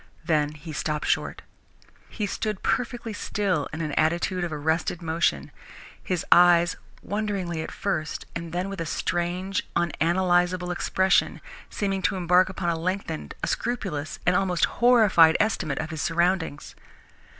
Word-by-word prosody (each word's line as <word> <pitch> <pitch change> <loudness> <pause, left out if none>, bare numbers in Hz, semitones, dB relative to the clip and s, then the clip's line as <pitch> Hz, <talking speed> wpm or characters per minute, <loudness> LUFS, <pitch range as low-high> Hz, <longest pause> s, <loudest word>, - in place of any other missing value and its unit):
Then 150 -2 +1
he 155 +1 -9
stopped 150 +1 -2
short. - - -1 0.7
He 210 - -3
stood 210 0 -3
perfectly 240 -2 -1
still 195 -7 -1
in 160 - -5
an 155 -2 -2
attitude 170 +4 0
of 175 - -3
arrested 160 +3 -1
motion, 160 - -1 0.5
his 180 -3 -2
eyes, 175 -1 +6 0.3
wonderingly 200 -6 -2
at - - -5
first, 165 -6 -3
and 170 -1 -5
then 180 +3 -2
with 195 -3 -5
a 165 - -3
strange, 180 +4 -2
unanalysable 175 +2 +1
expression, 190 +1 +1 0.3
seeming 195 -2 -2
to 185 - +1
embark 180 0 +3
upon 185 -2 -2
a 165 -1 -1
lengthened, 170 - -3
a - - 0
scrupulous, 190 -11 -3
an 180 - +4
almost 180 -2 +2 0.2
horrified 215 -10 +6
estimate 185 -10 0
of 160 +1 -4
his 160 -2 -4
surroundings. 170 -1 0
175 Hz, 140 wpm, -25 LUFS, 160-190 Hz, 0.7 s, eyes